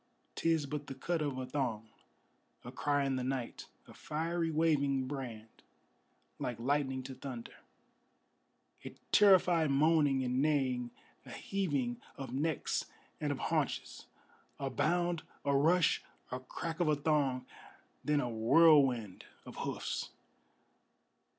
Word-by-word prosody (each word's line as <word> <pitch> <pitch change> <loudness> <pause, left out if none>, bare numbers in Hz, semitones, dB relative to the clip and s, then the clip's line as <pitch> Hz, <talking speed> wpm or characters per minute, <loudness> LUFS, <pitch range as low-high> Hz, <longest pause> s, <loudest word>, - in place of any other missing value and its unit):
'Tis 165 -3 +1
but 145 0 -5
the 135 - -6
cut 165 +5 -2
of 145 -3 -2
a 130 - -3
thong, 125 -5 -2 0.8
a - - -7
cry 145 -1 0
in 135 -1 0
the 130 - -2
night, 130 -2 -4 0.2
A - - -13
fiery 165 +2 -2
waving 145 -4 +2
brand 120 -6 -7 0.8
like 120 -2 -3
lightning 130 +1 0
to 130 - -7
thunder, 125 -3 -7 1.3
A - - -8 0.2
terrified 180 -6 +5
moaning 145 -1 +3
and 125 +1 0
neighing, 130 -5 +1 0.3
a - - -13
heaving 140 -11 -2 0.2
of 130 -3 -6
necks 150 +3 -1 0.3
and - - -1
of - - -2 0.2
haunches; - - -2 0.5
A 135 -1 -3
bound, 175 0 +1 0.2
a 140 0 +2
rush, 165 +4 +3 0.3
a 125 - -3
crack 160 +6 -6
of 175 - +2
a 155 - +4
thong, 145 -3 +1 0.6
then 150 -1 +2
a 125 - -2
whirlwind 120 - +4 0.2
of - - -10
hoofs! - - -3
140 Hz, 130 wpm, -33 LUFS, 130-155 Hz, 1.3 s, terrified